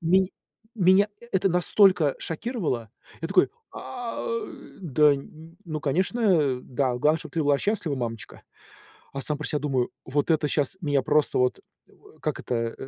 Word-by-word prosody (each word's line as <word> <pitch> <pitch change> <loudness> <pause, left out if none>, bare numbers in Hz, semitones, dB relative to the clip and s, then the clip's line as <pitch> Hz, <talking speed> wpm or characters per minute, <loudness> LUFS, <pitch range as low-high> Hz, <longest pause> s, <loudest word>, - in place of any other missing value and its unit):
Ме 185 +2 +3 0.5
...меня 190 +2 +5 0.2
это 195 +1 +2
настолько 180 -3 +4
шокировало! 160 - -3 0.3
Я 165 - -2
такой: 190 0 +4 0.2
"А, 245 -2 -6 0.6
да, 150 -2 +4 0.5
ну, 155 -3 -4
конечно, 165 - +2
да. 130 -1 -1
Главное, 150 +5 +3
чтоб 155 -2 -9
ты 165 - 0
была 145 -1 +3
счастлива, 195 -7 -1
мамочка". 115 -3 -5 0.7
А 135 - -3
сам 150 +2 -2
про 150 - -4
себя 150 - -1
думаю: 130 -4 0
"Вот 145 +4 -1
это 155 -2 +2
щас 145 +3 -1
меня 145 -3 +2
просто 150 +2 +2
вот 125 -1 +1 0.6
Как - - -2
это 115 -1 -2
150 Hz, 145 wpm, -26 LUFS, 135-185 Hz, 0.7 s, меня